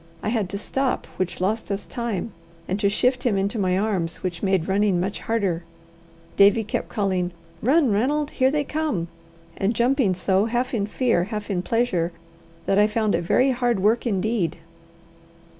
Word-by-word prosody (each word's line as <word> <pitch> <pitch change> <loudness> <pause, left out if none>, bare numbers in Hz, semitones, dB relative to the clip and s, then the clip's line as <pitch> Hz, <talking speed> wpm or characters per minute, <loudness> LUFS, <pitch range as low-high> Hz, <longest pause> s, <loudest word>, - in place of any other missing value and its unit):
I - - 0
had 215 -5 0
to 200 - -3
stop, 265 +5 -1
which 180 -2 -2
lost 210 +5 -1
us 200 0 -3
time, 230 -4 -3 0.4
and 190 +3 -1
to 200 -1 +3
shift 250 +5 +1
him 225 -6 +1
into 200 +3 -1
my 185 -2 +1
arms, 190 -6 -1
which 175 -3 -3
made 190 -4 +1
running 195 -1 +2
much 190 +3 -2
harder. 195 -7 -1 0.7
Davie 200 +3 +5
kept 210 - -3
calling, 185 -4 0 0.3
"Run, 275 +1 +3
Ranald! 285 +8 +1
here 260 -1 +2
they 295 +1 0
come!" 285 - -2 0.5
and 200 +4 0
jumping 240 -4 +2
so, 190 +2 +2
half 245 +3 -1
in 205 -4 0
fear, 220 -6 +1
half 210 0 -5
in 180 -2 0
pleasure, 185 -6 0 0.5
that 195 - +2
I 210 - +5
found 215 -1 0
it - - +1
very 255 +10 +3
hard 245 -4 +1
work 220 +5 +2
indeed. 210 -3 0
210 Hz, 175 wpm, -23 LUFS, 190-240 Hz, 0.7 s, Davie